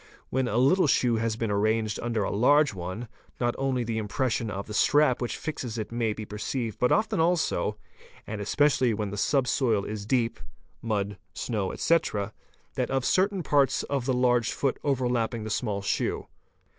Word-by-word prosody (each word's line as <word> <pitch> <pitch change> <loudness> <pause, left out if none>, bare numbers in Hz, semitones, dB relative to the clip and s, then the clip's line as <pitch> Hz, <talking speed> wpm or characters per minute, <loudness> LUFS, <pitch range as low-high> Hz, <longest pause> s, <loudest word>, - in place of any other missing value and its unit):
When 130 -1 +1
a 115 - -1
little 145 +8 +4
shoe 120 -4 +3
has 115 0 0
been 115 -2 -2
arranged 110 +1 +1
under 115 -3 -1
a - - -2
large 140 +5 +4
one, 95 +6 -5 0.3
not 120 -1 +1
only 135 -2 0
the 115 -1 -2
impression 115 +1 -1
of 100 -1 -4
the 105 - -8
strap 145 +2 +3
which 120 - -2
fixes 125 -7 -5
it 110 -1 -4
may 115 -2 0
be 110 0 -5
perceived 110 +2 -4
but 125 - +2
often 215 -2 +2
also, 165 -10 +1 0.5
and 105 -1 -5
especially 130 +1 +2
when 105 -2 -3
the - - -4
sub 135 +4 +1
soil 115 -8 +1
is 105 -1 -5
deep 120 -1 +1 0.4
(mud, 100 -3 -2 0.2
snow, 105 -6 -2
etc.), 110 -11 0 0.4
that - - -1
of 135 -1 0
cer 185 +1 +4
tain 195 -3 -5
parts 140 -2 +2
of 140 -3 -2
the 130 - +2
large 125 -2 +2
foot 135 -2 -1
overlapping 120 -4 0
the 110 - -5
small 100 -3 -1
shoe. - - -1
120 Hz, 180 wpm, -27 LUFS, 105-135 Hz, 0.5 s, little